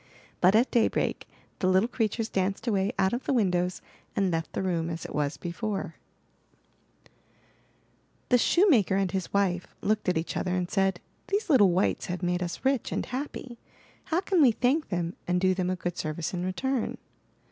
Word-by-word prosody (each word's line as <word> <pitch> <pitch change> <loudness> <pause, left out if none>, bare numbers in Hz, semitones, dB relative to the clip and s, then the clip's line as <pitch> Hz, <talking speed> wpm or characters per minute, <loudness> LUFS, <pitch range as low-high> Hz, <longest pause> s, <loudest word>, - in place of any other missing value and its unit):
But 185 +3 +5
at 235 +4 +3
daybreak 235 -3 +1 0.3
the 185 - +1
little 190 +4 +4
creatures 225 -2 -1
danced 195 +3 -1
away 200 -3 +1
out 190 +1 +2
of 245 - -3
the - - +1
windows 180 -6 +1 0.3
and 195 -2 +1
left 165 -1 -2
the - - -2
room 170 -3 -1
as 165 0 -5
it - - -7
was 145 0 -1
before. 205 +5 -4
MY - - -4 1.1
BOOK - - -27
HOUSE - - -37
The 245 - +6
shoemaker 260 - +4
and 195 -2 +1
his 190 -2 -3
wife 185 -3 0
looked 215 -2 0
at 180 - +1
each 160 - -3
other 180 -1 -1
and 180 -1 -2
said: 195 -2 +1 0.3
'These 400 -2 0
little 205 -9 +6
wights 180 +3 +1
have 180 0 -4
made 175 0 0
us 175 +7 -5
rich 265 -3 +1
and - - -1
happy. 255 -2 -6 0.5
How 330 +3 0
can 375 -3 +2
we 255 -5 +6
thank 265 +8 +1
them 175 -2 -2
and 180 0 +2
do 185 0 +3
them 185 -1 -1
a 185 - 0
good 175 -1 -4
service 155 +3 -3
in 180 -1 -2
return?" 245 +7 -1
190 Hz, 190 wpm, -28 LUFS, 180-235 Hz, 1.1 s, The